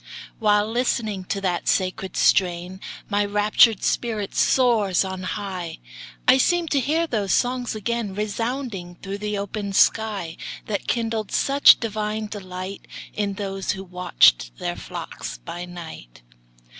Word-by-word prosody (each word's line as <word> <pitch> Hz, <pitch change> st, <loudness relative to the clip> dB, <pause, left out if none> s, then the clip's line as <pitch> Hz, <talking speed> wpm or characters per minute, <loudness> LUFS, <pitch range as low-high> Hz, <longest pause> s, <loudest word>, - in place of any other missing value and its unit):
While 210 Hz, -2 st, +3 dB
listening 220 Hz, -5 st, -1 dB
to 195 Hz, -, -2 dB
that 180 Hz, -3 st, -1 dB
sacred 185 Hz, 0 st, 0 dB
strain, 180 Hz, 0 st, +2 dB, 0.3 s
My 205 Hz, 0 st, +1 dB
raptured 210 Hz, +1 st, +4 dB
spirit 215 Hz, -4 st, -1 dB
soars 220 Hz, -8 st, +3 dB
on 190 Hz, -1 st, -5 dB
high; 185 Hz, -3 st, -4 dB, 0.5 s
I 265 Hz, -, +7 dB
seem 350 Hz, +4 st, +2 dB
to 280 Hz, -, +2 dB
hear 315 Hz, +6 st, +1 dB
those 210 Hz, -, -1 dB
songs 245 Hz, -1 st, 0 dB
again 215 Hz, -2 st, -2 dB
Resounding 215 Hz, -3 st, -3 dB
through 200 Hz, +1 st, -5 dB
the 210 Hz, 0 st, -2 dB
open 200 Hz, 0 st, -4 dB
sky, 200 Hz, -5 st, +2 dB, 0.3 s
That 205 Hz, -2 st, -3 dB
kindled 225 Hz, -3 st, -1 dB
such 280 Hz, +1 st, +6 dB
divine 215 Hz, -1 st, -2 dB
delight, 190 Hz, -2 st, -7 dB, 0.3 s
In 205 Hz, -1 st, -1 dB
those 195 Hz, -1 st, -3 dB
who 190 Hz, -, -7 dB
watched 170 Hz, -, +3 dB
their -, -, -3 dB
flocks -, -, -7 dB
by 175 Hz, -, -7 dB
night. 160 Hz, -, -10 dB
205 Hz, 130 wpm, -23 LUFS, 185-225 Hz, 0.5 s, I